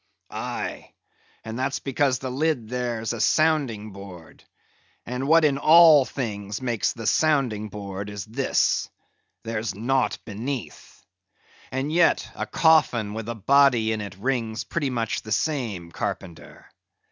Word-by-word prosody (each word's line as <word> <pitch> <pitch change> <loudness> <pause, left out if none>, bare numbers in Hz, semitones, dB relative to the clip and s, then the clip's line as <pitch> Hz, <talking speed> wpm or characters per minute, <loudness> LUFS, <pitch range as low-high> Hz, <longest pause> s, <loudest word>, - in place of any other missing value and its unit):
"Aye, - - -5 0.5
and 110 +2 -6
that's 135 +2 -1
because 135 -1 0
the 130 0 -5
lid 135 -5 -1
there's 120 -2 -2
a 115 - -4
sounding 135 -8 +1
board; 95 -4 -12 0.6
and 125 +3 -3
what 160 +1 +5
in 140 -2 +2
all 155 -3 +7
things 105 -7 -4
makes 120 -4 -1
the 115 -1 -8
sounding 120 -4 +1
board 100 -1 -6
is 100 -3 -6
this—there's 115 -2 -3
naught 130 +5 0
beneath. 120 +5 -6 0.6
And 135 +4 -3
yet, 175 0 +3
a - - -5
coffin 130 -10 +3
with 110 +1 -5
a 115 - -3
body 120 0 +4
in 110 -1 -2
it 100 -2 -7
rings 115 -1 -2
pretty 145 -5 -2
much 115 -3 -2
the 110 - -10
same, 110 - -2
Carpenter. 85 0 -6
120 Hz, 135 wpm, -24 LUFS, 105-140 Hz, 0.6 s, all